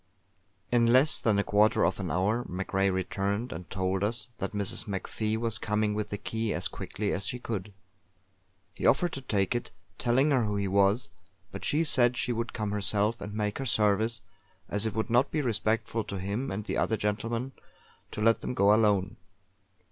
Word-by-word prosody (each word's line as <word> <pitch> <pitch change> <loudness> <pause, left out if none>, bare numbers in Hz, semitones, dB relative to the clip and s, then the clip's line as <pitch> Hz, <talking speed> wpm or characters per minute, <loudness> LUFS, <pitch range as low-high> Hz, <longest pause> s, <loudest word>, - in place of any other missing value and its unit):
In 120 -1 +4
less 130 +5 +5
than 110 -3 +2
a 100 - +2
quarter 105 +2 +3
of - - 0
an - - -3
hour 105 +7 +1
MacRae 95 +1 0
returned 100 +5 -2
and 80 -1 -7
told 95 0 -1
us 115 +4 -1
that 100 -1 -2
Mrs. 105 0 -1
MacFie 105 +2 -2
was 115 0 -2
coming 105 0 0
with 105 0 -3
the 105 - -3
key 110 +1 -2
as - - -2
quickly 105 0 -4
as 95 0 -2
she 125 - -3
could. 105 -5 -5 1.0
He - - -1
offered 175 +5 +3
to 135 - -5
take 100 -6 0
it, 120 - -3 0.3
telling 130 +5 +3
her 130 -4 +3
who 105 -1 -1
he 100 -1 -1
was; 100 +1 +2 0.4
but - - -7
she 155 +3 +1
said 125 -5 +3
she 120 - 0
would 115 +1 -3
come 105 -3 -3
herself 105 +2 0
and 105 0 -6
make 105 +1 -2
her 135 - -3
service, 110 +1 +2 0.5
as 105 +2 0
it 110 - -4
would 110 0 -2
not 125 +4 +4
be 155 - -1
respectful 115 -1 0
to 100 -2 -5
him 100 +8 -3
and 105 -1 -4
the - - -2
other 110 - +1
gentlemen 115 +5 -2 0.6
to 105 - -6
let 115 +1 +4
them 125 - -4
go 100 -3 +5
alone. 105 -1 +2
105 Hz, 195 wpm, -29 LUFS, 100-115 Hz, 1.0 s, less